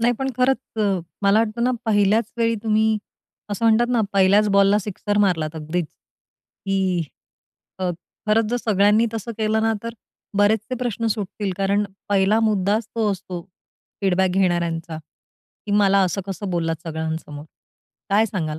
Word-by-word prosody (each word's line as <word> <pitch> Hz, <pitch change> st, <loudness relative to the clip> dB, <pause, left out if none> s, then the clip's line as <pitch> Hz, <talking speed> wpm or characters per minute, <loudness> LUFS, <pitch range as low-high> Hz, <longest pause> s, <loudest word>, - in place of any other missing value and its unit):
नाही 240 Hz, +1 st, +3 dB
पण 270 Hz, 0 st, -1 dB
खरंच, 260 Hz, +1 st, +3 dB, 0.2 s
अ, 200 Hz, -3 st, +1 dB, 0.2 s
मला 200 Hz, +2 st, +4 dB
वाटत 225 Hz, 0 st, -1 dB
ना, 250 Hz, -, +3 dB
पहिल्याच 210 Hz, +1 st, +3 dB
वेळी 230 Hz, 0 st, +2 dB
तुम्ही 220 Hz, 0 st, +2 dB, 0.5 s
असं 215 Hz, +3 st, -2 dB
म्हणतात 225 Hz, +1 st, +4 dB
ना, 240 Hz, -2 st, +2 dB
पहिल्याच 200 Hz, +2 st, +4 dB
बॉलला 200 Hz, +1 st, +5 dB
सिक्सर 205 Hz, +1 st, -2 dB
मारलात 165 Hz, -6 st, +1 dB
अगदीच, 160 Hz, +2 st, -2 dB, 0.8 s
की 190 Hz, -3 st, +1 dB, 0.8 s
अ, 185 Hz, -1 st, -1 dB, 0.4 s
खरंच 220 Hz, +1 st, +3 dB
जर 245 Hz, -, +1 dB
सगळ्यांनी 210 Hz, 0 st, +3 dB
तसं 225 Hz, +1 st, -4 dB
केलं 220 Hz, 0 st, +1 dB
ना, 225 Hz, 0 st, +2 dB
तर 230 Hz, -, -4 dB, 0.5 s
बरेचसे 215 Hz, +4 st, +2 dB
प्रश्न 230 Hz, -2 st, -2 dB
सुटतील. 205 Hz, -2 st, -2 dB
कारण 200 Hz, +1 st, +1 dB, 0.2 s
पहिला 200 Hz, +2 st, +3 dB
मुद्दाच 210 Hz, +2 st, +1 dB
तो 220 Hz, -2 st, +1 dB
असतो, 180 Hz, -2 st, -6 dB, 0.6 s
फीडबॅक 190 Hz, -1 st, +2 dB
घेणाऱ्यांचा. 170 Hz, -3 st, 0 dB, 0.7 s
की 205 Hz, -, -2 dB
मला 200 Hz, -1 st, +4 dB
असं 185 Hz, +2 st, -1 dB
कसं 195 Hz, 0 st, -5 dB
बोललात 165 Hz, -2 st, -2 dB
सगळ्यांसमोर, 160 Hz, -2 st, -5 dB, 0.7 s
काय 210 Hz, +3 st, +4 dB
सांगाल 160 Hz, -7 st, -3 dB
205 Hz, 145 wpm, -22 LUFS, 185-220 Hz, 0.8 s, बॉलला